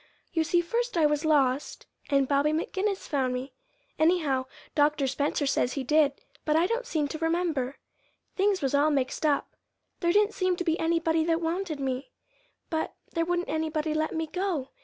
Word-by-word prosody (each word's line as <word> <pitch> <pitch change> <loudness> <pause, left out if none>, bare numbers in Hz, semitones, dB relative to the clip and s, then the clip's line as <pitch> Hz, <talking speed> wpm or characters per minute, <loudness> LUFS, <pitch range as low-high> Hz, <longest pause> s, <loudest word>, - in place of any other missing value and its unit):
"You 325 - +2
see 345 +2 +2
first 470 +4 -2
I 320 - +4
was 295 +1 +1
lost, 280 -3 +1 0.2
and 275 -2 +3
Bobby 285 +2 +2
McGinnis 380 +5 -1
found 260 -4 0
me. 255 +1 -5 0.5
Anyhow, 310 -6 +2 0.3
Dr. 295 -1 +2
Spencer 285 +3 0
says 255 -2 +1
he 275 - -3
did, 300 +1 +3 0.3
but 305 - +1
I 330 +2 +4
don't 475 +5 -1
seem 310 -10 0
to 315 - -5
remember. 325 -5 0 0.6
Things 395 -3 +1
was 270 - 0
all 290 +2 +4
mixed 280 +1 0
up. 285 -2 0 0.4
There 345 -1 +2
didn't 420 +3 +3
seem 370 -1 +1
to 355 - -3
be 330 -1 0
anybody 325 -1 +2
that 330 0 +2
wanted 335 -1 -2
me, 265 0 -3 0.6
but 320 -1 -2 0.2
there 330 -1 +1
wouldn't 350 +1 -1
anybody 315 0 -1
let 310 +1 -1
me 320 0 -1
go. 340 -5 -2
315 Hz, 180 wpm, -28 LUFS, 285-345 Hz, 0.6 s, I